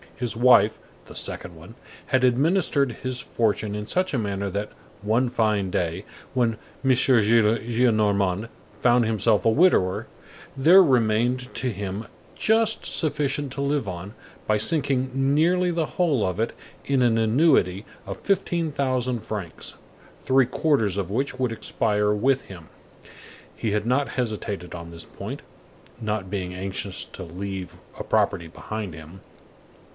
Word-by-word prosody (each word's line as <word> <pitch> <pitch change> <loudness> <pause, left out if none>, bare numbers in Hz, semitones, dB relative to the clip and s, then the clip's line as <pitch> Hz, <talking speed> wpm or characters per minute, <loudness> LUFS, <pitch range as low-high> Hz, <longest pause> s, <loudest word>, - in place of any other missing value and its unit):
His 120 -2 -3
wife—the 125 +2 +2
second 85 - -4
one—had 115 - -4
administered 140 +1 +2
his 130 -1 -2
fortune 110 -3 -1
in 105 0 -4
such 185 +9 -1
a 130 - +1
manner 100 -2 -2
that, 100 +3 -3 0.3
one 115 +4 +2
fine 105 -5 0
day, 90 +2 -2 0.3
when 115 -3 +1 0.3
M. 135 - +3
Gillenormand 110 -4 +3 0.3
found 120 -1 +4
himself 110 -2 +1
a - - +6
widower, 110 - +3 0.5
there 175 +8 +7
remained 125 -1 +1
to 130 - -1
him 100 +1 -5 0.3
just 220 0 +2
sufficient 145 -3 0
to 140 - -4
live 140 -4 0
on, 95 +2 -6 0.3
by 105 - +3
sinking 130 +2 +1 0.2
nearly 180 +4 +3
the 165 -2 -1
whole 155 - +1
of 95 +1 -2
it 115 - -1 0.3
in 135 -2 +1
an 120 -2 +3
annuity 110 - +3 0.2
of - - -5
fifteen 175 -5 0
thousand 130 -3 -1
francs, 100 -7 -6 0.4
three 130 -2 +3
quarters 125 - +1
of 95 -3 -2
which 130 +3 -2
would 125 -2 0
expire 105 -2 0
with 130 +6 +1
him. 85 -5 -12 0.9
He 110 - -2
had 105 +1 0
not 135 +3 +1
hesitated 105 -6 -3
on 85 0 -8
this 85 0 -10
point, - - -7 0.6
not 105 -3 -3
being 90 -3 -3
anxious 95 +1 -4
to 95 - -9
leave 95 +1 -6 0.2
a - - -3
property 85 - +1
behind 105 +3 -6
him. 80 +4 -12
115 Hz, 140 wpm, -24 LUFS, 100-135 Hz, 0.9 s, there